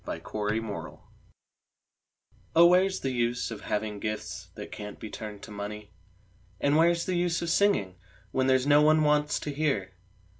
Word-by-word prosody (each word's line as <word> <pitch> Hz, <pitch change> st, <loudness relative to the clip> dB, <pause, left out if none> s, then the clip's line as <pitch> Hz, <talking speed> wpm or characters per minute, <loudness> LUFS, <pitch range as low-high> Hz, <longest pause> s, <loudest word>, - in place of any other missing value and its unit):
WHERE'S -, -, -6 dB
THE 105 Hz, 0 st, -2 dB
USE 110 Hz, -2 st, -5 dB, 1.6 s
Oh, 170 Hz, +1 st, +8 dB
where's 185 Hz, +2 st, +4 dB
the 135 Hz, -, -1 dB
use 120 Hz, 0 st, -1 dB
of 110 Hz, -, -7 dB
having 105 Hz, -1 st, -3 dB
gifts 105 Hz, 0 st, -5 dB
that -, -, -8 dB
can't 105 Hz, -1 st, -8 dB
be 110 Hz, -, -8 dB
turned 105 Hz, -2 st, -8 dB
to -, -, -9 dB
money? 105 Hz, 0 st, -7 dB, 0.7 s
And 145 Hz, +1 st, +2 dB
where's 170 Hz, +1 st, +3 dB
the 185 Hz, -, -1 dB
use 175 Hz, -1 st, 0 dB
of 170 Hz, -, -1 dB
singing, 135 Hz, -, +2 dB, 0.3 s
when 130 Hz, 0 st, +1 dB
there's 130 Hz, 0 st, +3 dB
no 145 Hz, +1 st, +6 dB
one 155 Hz, +1 st, +5 dB
wants 150 Hz, 0 st, +2 dB
to 145 Hz, -, -4 dB
hear? 135 Hz, -11 st, -1 dB
130 Hz, 165 wpm, -28 LUFS, 105-155 Hz, 1.6 s, Oh